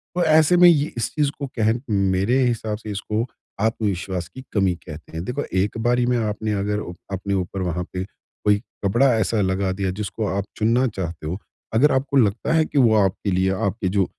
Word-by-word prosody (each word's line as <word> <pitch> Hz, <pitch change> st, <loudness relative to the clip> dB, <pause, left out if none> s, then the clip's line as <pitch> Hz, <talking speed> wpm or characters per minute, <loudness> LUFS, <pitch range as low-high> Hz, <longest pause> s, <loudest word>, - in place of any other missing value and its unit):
तो 180 Hz, -, +2 dB
ऐसे 160 Hz, +2 st, +5 dB
में 175 Hz, 0 st, +8 dB
ये 150 Hz, -3 st, +2 dB
इस 115 Hz, -, -1 dB
चीज़ 150 Hz, -2 st, +2 dB
को 140 Hz, -, -3 dB
कह 110 Hz, 0 st, +3 dB, 0.2 s
मेरे 100 Hz, +3 st, +2 dB
हिसाब 110 Hz, -3 st, -1 dB
से 110 Hz, -1 st, -7 dB
इसको 105 Hz, +3 st, -2 dB, 0.4 s
आत्मविश्वास 100 Hz, -5 st, -1 dB
की 130 Hz, -, -11 dB
कमी 95 Hz, -4 st, +2 dB
कहते 80 Hz, -2 st, -11 dB
हैं। 80 Hz, +1 st, -4 dB
देखो, 135 Hz, +6 st, -2 dB
एक 95 Hz, +3 st, 0 dB
बारी 120 Hz, +2 st, +2 dB
में 125 Hz, 0 st, +2 dB
आपने 110 Hz, -1 st, -1 dB
अगर 105 Hz, +1 st, -1 dB, 0.3 s
अपने 95 Hz, +1 st, -2 dB
ऊपर 95 Hz, 0 st, -2 dB
वहाँ 90 Hz, -1 st, -1 dB
पे 90 Hz, 0 st, -2 dB, 0.4 s
कोई 105 Hz, -1 st, +5 dB, 0.3 s
कपड़ा 120 Hz, +7 st, +4 dB
ऐसा 110 Hz, 0 st, +1 dB
लगा 95 Hz, 0 st, 0 dB
दिया 95 Hz, 0 st, -2 dB
जिसको 105 Hz, +2 st, -3 dB
आप 100 Hz, +1 st, -1 dB
चुनना 115 Hz, +4 st, +2 dB
चाहते 85 Hz, -8 st, -5 dB
हो। 85 Hz, +4 st, -3 dB, 0.4 s
अगर 135 Hz, +7 st, +4 dB
आपको 135 Hz, +1 st, +1 dB
लगता 115 Hz, +5 st, +2 dB
है 160 Hz, -1 st, +4 dB
कि -, -, -4 dB
वो 120 Hz, -5 st, +5 dB
आपके 95 Hz, +1 st, -1 dB
लिए 95 Hz, +1 st, +2 dB, 0.2 s
आपके 95 Hz, -1 st, -2 dB
जो 95 Hz, 0 st, +2 dB
105 Hz, 200 wpm, -22 LUFS, 95-120 Hz, 0.4 s, में